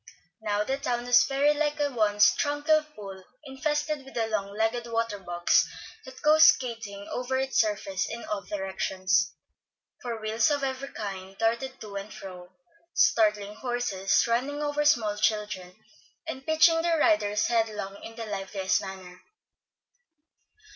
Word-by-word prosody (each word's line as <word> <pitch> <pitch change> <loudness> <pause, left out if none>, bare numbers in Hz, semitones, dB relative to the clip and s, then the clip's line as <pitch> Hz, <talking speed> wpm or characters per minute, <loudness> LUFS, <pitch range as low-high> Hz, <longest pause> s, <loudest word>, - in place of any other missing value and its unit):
Now 210 -1 0
the 265 +5 -2
town 240 -3 -2
was 245 0 +6
very 280 +2 +2
like 295 0 -1
a 290 -1 +1
once 210 -3 +4
tranquil 290 +2 +2
pool 195 -2 -9 0.2
infested 295 +1 -2
with 270 - -14
the 230 -1 +1
long 210 -3 -2
legged 230 +2 0
water 230 -2 -2
bugs 175 -2 +2 0.4
that 260 0 -12
go 305 +1 +5
skating 225 -9 +3
over 255 +1 -2
its 265 0 +2
surface 200 -3 -2
in 235 - -6
all 205 -1 -3
directions; 190 0 -1 0.7
for 235 -2 -4
wheels 220 +7 +1
of 285 -2 0
every 265 0 -3
kind 195 -3 -7
darted 235 +4 -1
to 205 -2 -7
and 200 +2 -7
fro, 180 -2 -10 0.4
startling 210 - +3
horses, 240 -6 0
running 270 +6 -1
over 295 0 0
small 225 -8 +3
children, 210 -4 -1 0.5
and 270 -3 -6
pitching 320 +1 +5
their 335 -1 +1
riders 215 -11 +2
headlong 215 -4 -1
in 225 - -9
the 230 -1 -6
liveliest 195 -2 -1
manner. 185 -2 -9
225 Hz, 145 wpm, -27 LUFS, 200-270 Hz, 0.7 s, was